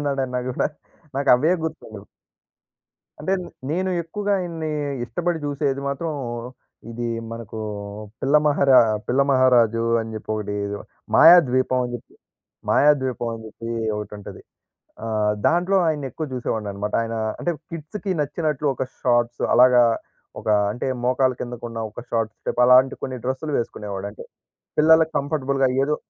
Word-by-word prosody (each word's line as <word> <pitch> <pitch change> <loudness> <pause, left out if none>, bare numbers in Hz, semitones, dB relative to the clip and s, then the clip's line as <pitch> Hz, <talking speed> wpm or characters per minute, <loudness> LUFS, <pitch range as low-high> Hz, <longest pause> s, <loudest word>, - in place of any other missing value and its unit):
ఉన్నాడన్నా 135 -3 -1
కూడా. 125 - 0 0.5
నాకు 140 0 -1
అవే 155 +7 +2
గుర్తుండవు. 110 -10 -7 1.2
అంటే 155 +6 -1 0.4
నేను 185 +4 0
ఎక్కువగా 205 +5 -2
ఇయన్ని 165 -3 -4 0.3
ఇష్టపడి 175 +5 -2
చూసేది 140 -1 -1
మాత్రం 155 +4 -3 0.8
ఇది 120 +1 -4 0.3
మనకు 115 -1 -7 0.6
పిల్లమహారా 140 -1 +4 0.3
పిల్ల 130 +3 +2
మహారాజు 120 -3 +4 0.2
అని 110 0 -6
చెప్పి 110 0 -7
ఒకటి 105 -1 -3 0.6
'మాయాద్వీపం' 130 -7 +6
అని 120 - -5
చెప్పి 120 - -9 0.6
'మాయాద్వీపం' 130 -5 +2
అని 115 - -9
చెప్పి 115 +1 -9 0.3
ఒకటి 105 -1 -6
ఉంటది. 100 -1 -10 0.6
ఆ! - - -4 0.4
దాంట్లో 180 +4 +2
ఆయన్ని 150 -3 -1
ఎక్కువ 155 - -4
చూసేవాడిని 110 -4 -3
అనమాట. 105 +1 -4
ఆయన 115 0 -3 0.2
అంటే 175 - 0 0.2
కిడ్స్‌కి 165 +5 -5
నచ్చినట్లు 150 0 -1
ఒక 130 - -3 0.2
షార్ట్స్ 120 -1 +1
అలాగా 125 0 +7 0.6
ఒక - - -11 0.2
అంటే 120 +4 -4 0.2
మోకాళ్ళ 130 +1 +2
కిందకు 120 -1 -6
ఉన్న 115 -1 -6
ఒక - - -9
షార్ట్స్ 115 -2 -1
టైప్ - - -1
అలాంటి 130 +2 +6
కొన్ని 130 - -3
డ్రెస్సులు 130 +4 -2
వేసుకునేవాడు. 100 -4 -5
అంటే - - -11 0.6
పిల్లలకి 160 +1 +5
కంఫర్టబుల్‌గా 140 -2 0 0.2
ఏదో 150 +2 0
130 Hz, 130 wpm, -23 LUFS, 115-150 Hz, 1.2 s, అలాగా